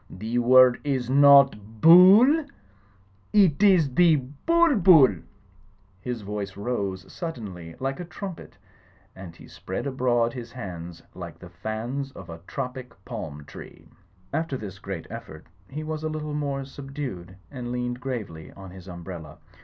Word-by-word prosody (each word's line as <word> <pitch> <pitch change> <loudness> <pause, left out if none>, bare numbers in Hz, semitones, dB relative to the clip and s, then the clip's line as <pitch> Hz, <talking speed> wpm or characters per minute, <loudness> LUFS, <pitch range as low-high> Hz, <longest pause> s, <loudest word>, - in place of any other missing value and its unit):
The 110 +6 -3
word 125 0 +5
is 130 -4 -2
not 140 0 +7 0.2
Bull; 195 - +7 0.9
it 190 -6 +4
is 180 -10 +4
the 170 +2 +5 0.3
Bul 335 -5 +4
Bul 170 -8 +7
V 90 -4 -8 0.8
His 120 -1 -5
voice 100 -1 -5
rose 100 -4 -4
suddenly 100 - -7
like 135 +3 -3
a 175 - -5
trumpet 180 0 -9 0.6
and 90 -3 -10
he - - -15
spread 95 - -6
abroad 120 -3 0
his 120 -1 -8
hands 90 -8 -8
like - - -9
the 90 - -13
fans 115 +9 -5
of 85 -2 -11
a 85 - -9
tropic 125 -2 -6
palm 75 -2 -7
tree. - - -13 0.4
After 160 -4 -2
this 95 -5 -9
great 95 -5 -7
eflfect - - -9 0.3
he 150 +3 -6
was 155 0 -4
a 155 - -2
little 155 -1 -5
more 140 -2 -3
sub 135 0 -11
dued 95 -11 -6 0.2
and 125 -3 -6
leaned 125 0 -3
gravely 110 -12 -6
on 95 -2 -11
his 95 0 -13
umbrella. 85 -3 -9
125 Hz, 150 wpm, -25 LUFS, 95-150 Hz, 0.9 s, not